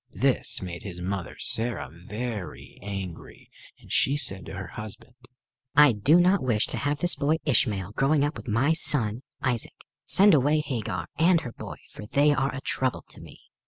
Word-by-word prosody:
This -, -, +1 dB
made 85 Hz, -2 st, -6 dB
his 90 Hz, -4 st, -7 dB
mother 90 Hz, 0 st, -4 dB
Sarah 115 Hz, +1 st, -2 dB
very 105 Hz, +3 st, -7 dB
angry, 95 Hz, -4 st, -8 dB, 0.3 s
and -, -, -15 dB
she 140 Hz, +2 st, +3 dB
said 95 Hz, -10 st, 0 dB
to -, -, -7 dB
her 95 Hz, -2 st, -7 dB
husband: 110 Hz, +3 st, -9 dB, 0.6 s
"I 150 Hz, -2 st, +7 dB
do 135 Hz, -, +4 dB
not 185 Hz, +3 st, +3 dB
wish 115 Hz, -5 st, +1 dB
to -, -, -3 dB
have 145 Hz, +1 st, -1 dB
this 175 Hz, +3 st, +2 dB
boy 150 Hz, +3 st, +1 dB
Ishmael 105 Hz, -8 st, +1 dB
growing 140 Hz, +6 st, +2 dB
up 145 Hz, +1 st, -1 dB
with -, -, -10 dB
my 125 Hz, +8 st, +2 dB
son 120 Hz, -8 st, +2 dB, 0.2 s
Isaac. 120 Hz, -4 st, -2 dB, 0.3 s
Send 200 Hz, 0 st, +6 dB
away 150 Hz, +2 st, +3 dB
Hagar 105 Hz, -, -3 dB
and 170 Hz, 0 st, +4 dB
her 120 Hz, -, -7 dB
boy, -, -, -8 dB, 0.2 s
for 105 Hz, -, -10 dB
they 145 Hz, +5 st, +3 dB
are 135 Hz, -1 st, 0 dB
a 130 Hz, -, -6 dB
trouble 130 Hz, -2 st, -1 dB
to -, -, -12 dB
me." -, -, -14 dB
125 Hz, 180 wpm, -26 LUFS, 100-145 Hz, 0.6 s, I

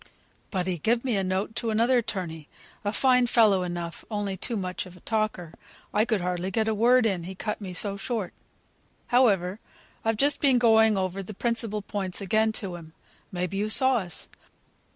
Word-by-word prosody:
But 185 Hz, -2 st, -2 dB
he 180 Hz, -2 st, -2 dB
gived 235 Hz, -, +1 dB
me 245 Hz, -4 st, +1 dB
a 195 Hz, -, +1 dB
note 190 Hz, +4 st, -2 dB
to 230 Hz, -, -1 dB
another 235 Hz, +3 st, +3 dB
'torney; 165 Hz, -8 st, -5 dB, 0.4 s
a 205 Hz, -, 0 dB
fine 250 Hz, +1 st, +3 dB
fellow 215 Hz, -6 st, +4 dB
enough, 175 Hz, -1 st, -5 dB
only 205 Hz, -3 st, -2 dB
too 225 Hz, +5 st, -2 dB
much 185 Hz, -1 st, -4 dB
of 180 Hz, 0 st, -14 dB
a -, -, -18 dB
talker; 215 Hz, -7 st, -2 dB, 0.4 s
I 210 Hz, +1 st, +3 dB
could 220 Hz, -5 st, 0 dB
hardly 180 Hz, +1 st, -2 dB
get 220 Hz, +3 st, 0 dB
a 220 Hz, -, +2 dB
word 240 Hz, +3 st, +4 dB
in, 185 Hz, -6 st, 0 dB
he 190 Hz, +1 st, -7 dB
cut 210 Hz, +2 st, -4 dB
me 190 Hz, -2 st, -6 dB
so 200 Hz, +2 st, -1 dB
short. 210 Hz, -2 st, -3 dB, 0.8 s
However, 205 Hz, -6 st, +3 dB, 0.4 s
I've 225 Hz, -1 st, 0 dB
just 285 Hz, +5 st, +2 dB
been 270 Hz, -3 st, +4 dB
going 220 Hz, -3 st, +5 dB
over 190 Hz, 0 st, -2 dB
the 195 Hz, +2 st, -9 dB
principal 225 Hz, -2 st, 0 dB
points 195 Hz, -3 st, -3 dB
again 215 Hz, +3 st, +1 dB
to 190 Hz, -5 st, -3 dB
him; 160 Hz, -2 st, -13 dB, 0.4 s
may 180 Hz, -1 st, -2 dB
be 195 Hz, +2 st, -5 dB
you 210 Hz, +2 st, -1 dB
saw 260 Hz, +2 st, +4 dB
us? 180 Hz, -6 st, -6 dB
205 Hz, 195 wpm, -26 LUFS, 185-225 Hz, 0.8 s, going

